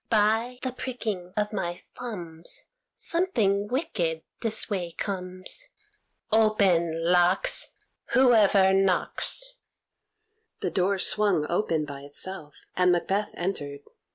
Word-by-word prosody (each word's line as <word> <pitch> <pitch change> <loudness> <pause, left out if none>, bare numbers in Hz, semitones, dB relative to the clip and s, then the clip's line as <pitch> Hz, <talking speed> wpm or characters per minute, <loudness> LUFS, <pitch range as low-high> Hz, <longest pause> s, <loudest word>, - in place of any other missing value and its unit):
"By 225 +3 +2
the 260 - -1
pricking 220 -8 -4
of 210 0 -1
my 175 -3 -4
thumbs, 170 -9 -4 0.3
Something 220 - +1
wicked 195 - -2 0.2
this 220 -2 +2
way 180 -5 -3
comes. 185 - -4 0.6
Open, 180 -7 +2
locks, 180 +1 +4 0.4
Whoever 210 -7 +5
knocks!" 195 - +1 1.0
The - - -1
door 195 +1 +1
swung 190 -5 +3
open 165 -4 0
by 140 -1 -8
itself, 150 +2 -7 0.2
and 180 0 +4
Macbeth 195 +4 -1
entered. 145 -6 -4
195 Hz, 100 wpm, -26 LUFS, 175-220 Hz, 1.0 s, Whoever